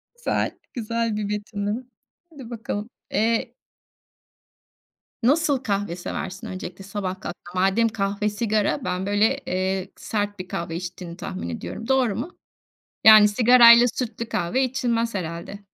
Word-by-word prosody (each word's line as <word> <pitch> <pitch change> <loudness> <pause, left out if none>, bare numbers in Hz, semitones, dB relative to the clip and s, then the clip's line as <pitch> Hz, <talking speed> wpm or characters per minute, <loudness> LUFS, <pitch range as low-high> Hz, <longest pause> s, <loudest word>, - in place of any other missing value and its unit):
Güzel, 480 - -2 0.2
güzel 230 -1 -2
bir 205 -1 -3
betimleme. 210 +2 -3 0.5
Hadi 275 -7 -11
bakalım. 225 -1 -5 0.2
Eee 225 +1 +1 1.7
Nasıl 290 +2 +3
kahve 200 -5 -1
seversin 190 +4 -5
öncelikle, 185 -1 -7
sabah 190 -1 -4
kalktığında? - - -4 0.2
Madem 195 +5 +3
kahve 205 -1 -1
sigara, 215 +3 0
ben 180 +1 -2
böyle, 205 +2 +2
eee, 185 +1 -2
sert 205 -2 -3
bir 185 - -6
kahve 170 -2 -4
içtiğini 175 0 -7
tahmin 85 - -5
ediyorum. 215 - -6
Doğru 260 -5 +2
mu? 300 +10 -6 0.7
Yani 215 -1 +9
sigarayla 235 +2 +7
sütlü 235 -2 -4
kahve 220 +5 0
içilmez 235 -4 -1
herhâlde. 170 +2 -5
210 Hz, 125 wpm, -24 LUFS, 190-235 Hz, 1.7 s, Yani